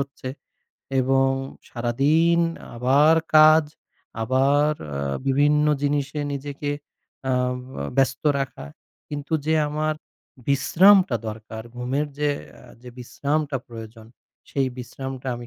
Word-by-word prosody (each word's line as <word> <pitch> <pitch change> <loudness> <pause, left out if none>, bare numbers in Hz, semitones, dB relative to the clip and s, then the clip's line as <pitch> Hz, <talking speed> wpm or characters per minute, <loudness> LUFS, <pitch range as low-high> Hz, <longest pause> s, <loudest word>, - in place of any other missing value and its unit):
হচ্ছে 140 -2 -6 0.7
এবং 135 +1 +3 0.4
সারাদিন 140 +8 +2 0.4
আবার 140 +6 +4 0.2
কাজ, 155 +1 +7 0.6
আবার 135 +5 +3 0.2
আ - - -7 0.3
বিভিন্ন 145 +2 +3 0.2
জিনিসে 145 0 -1
নিজেকে 145 +1 -4 0.6
আ - - +2 0.4
ব - - -11 0.2
ব্যস্ত 135 -1 +1 0.2
রাখা। 135 - -4 0.4
কিন্তু 145 0 -6
যে 160 - +3
আমার 155 +1 -1 0.5
বিশ্রামটা 180 +3 +5
দরকার, 110 +1 -7
ঘুমের 130 +5 -1
যে 150 0 +1 0.3
আ - - -17 0.2
যে 125 - -10
বিশ্রামটা 145 +3 -2
প্রয়োজন 115 -1 -10 0.4
সেই 135 -1 0
বিশ্রামটা 130 +1 -6
আমি 120 0 -9
140 Hz, 110 wpm, -23 LUFS, 125-150 Hz, 0.7 s, কাজ